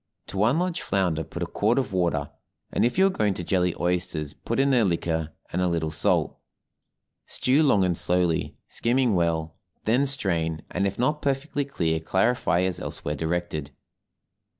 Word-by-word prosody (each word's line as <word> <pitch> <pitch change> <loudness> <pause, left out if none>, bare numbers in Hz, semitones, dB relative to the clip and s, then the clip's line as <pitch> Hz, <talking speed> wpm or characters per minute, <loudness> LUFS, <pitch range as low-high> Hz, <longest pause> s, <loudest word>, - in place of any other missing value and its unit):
To - - -6
one 115 +8 +3
large 175 0 -1
flounder 90 -5 0
put - - -5
a - - 0
quart 110 +5 +1
of 130 -7 -1
water, 90 -2 0 0.4
and - - +1
if 120 +6 +1
you 190 - +6
are - - +5
going 105 - 0
to 90 - -5
jelly 90 0 +1
oysters 85 -4 -1
put - - -3
in 140 0 +3
their 125 -3 +4
liquor 80 -4 -1 0.2
and 90 - 0
a 90 - +2
little 80 -2 -1
salt. 75 - +1 0.9
Stew 135 +4 +2
long 130 -10 +4
and 90 -2 +1
slowly, 90 -1 +1
skimming 120 -1 +1
well; 80 -3 0 0.3
then 125 +6 +3
strain, 85 - -1
and 100 +2 +1
if 100 - -4
not 150 +5 +1
perfectly 140 +1 -1
clear 80 -12 -1
clarify 95 +2 +1
as 95 0 -1
elsewhere 75 - -4
directed. 80 -2 -2
95 Hz, 175 wpm, -25 LUFS, 85-125 Hz, 0.9 s, you